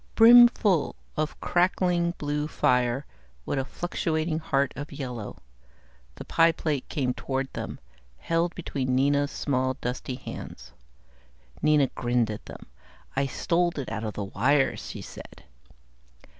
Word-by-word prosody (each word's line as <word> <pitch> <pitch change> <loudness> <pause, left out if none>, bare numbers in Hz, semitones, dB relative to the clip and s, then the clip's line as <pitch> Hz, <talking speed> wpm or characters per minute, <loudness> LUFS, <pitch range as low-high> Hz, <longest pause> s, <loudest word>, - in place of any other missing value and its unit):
Brimfull 230 -7 +6 0.2
of 155 0 -2
crackling 175 -1 +1
blue 150 0 -2
fire 125 -2 +1 0.4
with 140 - -1
a 135 - -2
fluctuating 160 -1 -2
heart 140 -4 0
of 145 +1 -7
yellow, 125 -7 -6 0.8
the - - -9
pie 165 0 +4
plate 155 -4 -3
came 130 -4 0
toward 135 +1 -3
them, - - -5 0.4
held 170 +1 -1
between 130 -7 -2
Nina's 140 +2 +2
small, 130 -3 -1
dusty 125 0 -4
hands. - - -9 0.9
Nina 150 -2 +4
grinned 120 -2 0
at 105 - -8
them. - - -10 0.5
"I 135 +1 +1
stole 175 +5 0
it 135 -5 -4
out 110 -1 -3
of 110 -1 -4
the 105 - -3
wires," 135 +8 +1
she - - -7
said. - - -11
145 Hz, 130 wpm, -27 LUFS, 130-165 Hz, 0.9 s, Brimfull